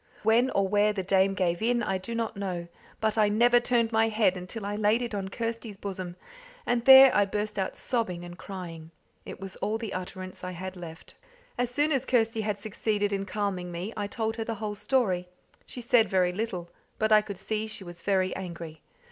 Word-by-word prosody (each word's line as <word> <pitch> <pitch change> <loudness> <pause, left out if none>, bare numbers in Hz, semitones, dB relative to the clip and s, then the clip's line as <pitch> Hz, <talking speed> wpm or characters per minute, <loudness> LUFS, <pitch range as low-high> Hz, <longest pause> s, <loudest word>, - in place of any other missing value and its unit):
When 230 +4 +4
or 195 -4 +1
where 205 +1 +3
the 195 -2 -3
dame 195 +1 +3
gave 175 -1 0
in, 235 +1 +2
I 190 -2 -1
do 230 +5 -6
not 230 -1 -2
know; 185 -4 -4 0.4
I 215 -1 +3
never 240 +3 +5
turned 240 -1 +1
my 225 0 +3
head 215 -4 +2
until 185 +4 -6
I 205 +1 -2
laid 215 +3 +2
it 235 - -4
on 195 -2 -3
Kirsty's 230 -1 -4
bosom, 185 -3 -5 0.5
and 235 -1 0
there 265 0 +10
I 205 - +5
burst 210 +1 -3
out 190 - -2
sobbing 185 -8 -2
and 175 0 -9
crying. 170 -4 -8 0.4
It - - -8
was 195 -1 -8
all 215 +1 -1
the 225 -3 -5
utterance 185 0 -6
I 180 0 -4
had 185 +2 -6
left. 165 -2 -10 0.4
As 245 -1 0
soon 290 +5 +1
as 270 -2 0
Kirsty 225 -2 +2
had 210 -1 -1
succeeded 205 0 -1
in 195 0 -1
calming 195 -4 -2
me, 180 +6 -5
I 205 -2 -2
told 225 +1 -2
her 225 - -1
the 225 0 -3
whole 210 0 -4
story. 195 -6 0 0.4
She 245 - -7
said 230 -3 +4
very 180 -1 +2
little, 185 -4 -4 0.3
but 220 0 +1
I 215 0 +7
could 205 -2 -7
see 215 +2 -2
she 215 -2 -6
was 175 -1 -10
very 190 -2 +1
angry. 170 -4 -7
205 Hz, 205 wpm, -28 LUFS, 185-225 Hz, 0.5 s, there